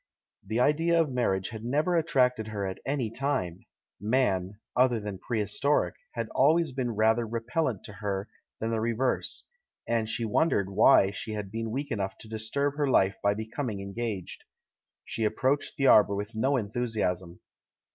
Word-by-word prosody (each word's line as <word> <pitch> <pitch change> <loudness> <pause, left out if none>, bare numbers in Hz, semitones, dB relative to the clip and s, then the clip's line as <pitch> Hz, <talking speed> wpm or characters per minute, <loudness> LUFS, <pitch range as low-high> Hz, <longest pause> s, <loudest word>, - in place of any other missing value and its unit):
The 110 +4 -2
idea 165 +6 +3
of 160 -4 +2
marriage 95 -7 0
had 110 -1 -8
never 150 +8 +1
attracted 125 -8 +2
her 105 -2 -3
at 95 -1 -4
any 135 -6 -1
time; 120 -10 -2 0.3
Man 105 -4 0
— - - -58
other 125 -2 +3
than 105 -3 -6
prehistoric 115 +7 0
— - - -47
had 115 -2 -2
always 155 +3 +3
been 125 -3 -2
rather 110 +2 +3
repel 120 +8 -1
lent 110 -7 -3
to 105 - -9
her 100 -1 -3 0.3
than 115 +1 -2
the 110 -1 0
reverse: 115 +3 -1 0.4
and 115 -2 0
she 115 +1 -1
wondered 105 - +1
why 95 0 +6
she 110 +2 -5
had 105 -2 -5
been 115 +1 -3
weak 140 +5 -3
enough 95 -3 -2
to - - -11
disturb 110 +7 -2
her 145 -1 +1
life 100 -7 +3
by 100 0 +2
becoming 110 0 -4
engaged. 100 -1 -5 0.6
She 115 - -3
approached 130 +6 0
the 135 - +1
arbour 105 -5 +6
with 105 +2 -4
no 130 +5 +1
enthusiasm. 105 -6 -2
115 Hz, 170 wpm, -28 LUFS, 105-130 Hz, 0.6 s, why